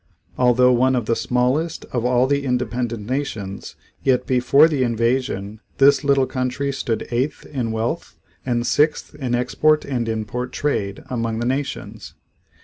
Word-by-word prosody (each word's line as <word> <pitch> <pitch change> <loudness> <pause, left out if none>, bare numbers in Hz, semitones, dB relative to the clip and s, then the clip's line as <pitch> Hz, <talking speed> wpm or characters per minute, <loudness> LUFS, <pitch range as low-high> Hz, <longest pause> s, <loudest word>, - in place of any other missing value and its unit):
Although 125 0 +4
one 130 +2 +3
of 120 -3 -1
the 115 - +1
smallest 125 +9 0
of 120 -2 -1
all 125 0 +3
the 140 +1 0
independent 120 -4 -2
nations 115 -8 -4 0.3
yet 130 -2 +2
before 130 +4 +5
the 150 -5 -1
invasion 115 -3 -1 0.2
this 140 +1 +5
little 140 -2 +3
country 130 +2 -2
stood 115 -4 -3
eighth 125 +5 -1
in 125 -6 -3
wealth 110 +1 -3 0.3
and 120 -2 -1
sixth 150 +4 +1
in 125 -4 -2
export 150 +5 +2
and 120 -4 -2
import 115 +3 -3
trade 100 -9 -2
among 115 -2 -2
the 120 - -2
nations. 135 +3 -4
125 Hz, 145 wpm, -21 LUFS, 115-135 Hz, 0.3 s, before